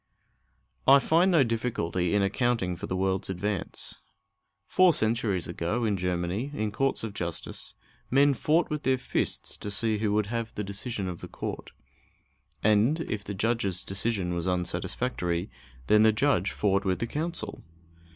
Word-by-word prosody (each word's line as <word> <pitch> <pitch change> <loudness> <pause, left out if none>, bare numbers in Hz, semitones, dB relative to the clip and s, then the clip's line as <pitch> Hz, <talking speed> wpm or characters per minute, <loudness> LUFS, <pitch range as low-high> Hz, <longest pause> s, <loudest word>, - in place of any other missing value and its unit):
I 135 +1 +9
find 165 +7 +3
no 165 -6 +5
difficulty 110 -7 -1
in 100 - +3
accounting 100 -2 0
for 85 - -6
the 95 - -2
world's 95 0 0
advance. 95 +1 -3 0.7
Four 185 -2 +5
centuries 110 - +1
ago, 105 +8 -1
in 105 -2 +1
Germany, 90 +6 -1
in 105 -1 -1
courts 135 +4 0
of 110 -3 -4
justice, 85 -5 -4 0.3
men 140 +2 +5
fought 160 +5 +1
with 150 -1 -1
their 130 -2 +2
fists 130 - -1
to 105 - -6
see 110 +1 0
who 105 -1 +1
should 105 - +2
have 115 +1 -4
the 105 - -2
decision 100 +1 -2
of 90 -2 -6
the - - -7
court; - - -6 0.9
and 110 +10 +3
if 105 -10 -3
the 100 0 -5
judge's 100 -3 0
decision 95 -2 -1
was 85 +1 -2
unsatisfactory, 90 +1 -1 0.3
then 105 +9 +5
the 110 0 +6
judge 110 -5 +2
fought 100 -1 +1
with 95 -2 +1
the 115 - -2
counsel. 160 +7 -4
105 Hz, 160 wpm, -28 LUFS, 95-120 Hz, 0.9 s, I